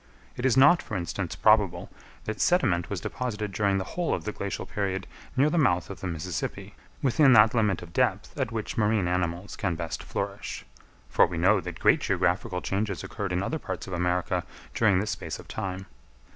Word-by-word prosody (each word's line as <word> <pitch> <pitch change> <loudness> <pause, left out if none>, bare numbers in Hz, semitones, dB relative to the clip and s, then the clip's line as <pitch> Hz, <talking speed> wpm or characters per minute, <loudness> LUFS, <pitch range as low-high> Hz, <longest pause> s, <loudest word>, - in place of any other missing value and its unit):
It 125 - 0
is 130 0 +2
not, 160 +6 +7
for 105 - -4
instance, 85 0 -3
probable 100 -5 +3 0.3
that 110 0 -4
sediment 95 - +2
was 95 -4 -3
deposited 105 -3 -3
during 100 0 +1
the 95 - -1
whole 175 - -1
of - - -6
the 105 - -3
glacial 100 -1 -4
period 95 -2 -2 0.3
near 145 +3 +4
the 170 - +2
mouth 90 - +2
of 95 - -8
the 95 - -4
Mississippi, 85 -1 -4 0.3
within 135 +1 +5
that 110 -1 +7
limit 105 -6 +1
of 85 -1 -12
depth - - 0
at 130 -3 -1
which 110 -2 -4
marine 105 -3 +2
animals 90 +1 -2
can 90 -4 -1
best 80 -2 -4
flourish: - - -5 0.4
for - - +4
we 85 -1 -5
know 95 +4 +4
that 90 -2 -7
great - - +4
geographical - - 0
changes 100 -1 -2
occurred 100 -2 -4
in 90 +1 0
other 160 +9 -2
parts 95 -8 -5
of 95 - -7
America 90 0 0 0.3
during 100 -5 +3
this 105 +2 -1
space - - -5
of - - -13
time. 95 0 -4
100 Hz, 195 wpm, -27 LUFS, 90-110 Hz, 0.4 s, not